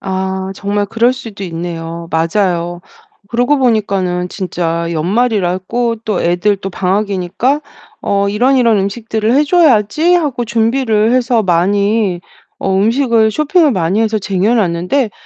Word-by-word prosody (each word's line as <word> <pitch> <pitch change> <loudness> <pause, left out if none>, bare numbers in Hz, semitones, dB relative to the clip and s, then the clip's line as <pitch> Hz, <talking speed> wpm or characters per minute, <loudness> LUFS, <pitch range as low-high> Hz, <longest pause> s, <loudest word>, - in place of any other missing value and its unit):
아 190 0 -3
정말 205 +1 -2
그럴 230 +4 +2
수도 225 -6 -9
있네요. 165 -1 -6
맞아요. 175 +1 0 0.5
그러고 245 +5 +1
보니까는 195 -7 0
진짜 170 -3 -3
연말이라고 205 +4 0
또 210 -5 -1
애들도 195 +3 0
방학이니까 195 +7 -1 0.4
'어 200 0 0
이런, 245 +7 +2
이런 230 -4 +3
음식들을 220 +3 -1
해 285 - +4
줘야지.' 310 - +3
하고 290 -8 0
준비를 225 -1 +1
해서 245 -2 +2
많이 200 +2 +1 0.4
어 195 - -1
음식을 225 +1 +2
쇼핑을 305 - +2
많이 185 +1 0
해서 220 -1 +1
쟁여 195 +3 0
놨는데 205 +5 0
205 Hz, 290 characters per minute, -14 LUFS, 185-235 Hz, 0.5 s, 해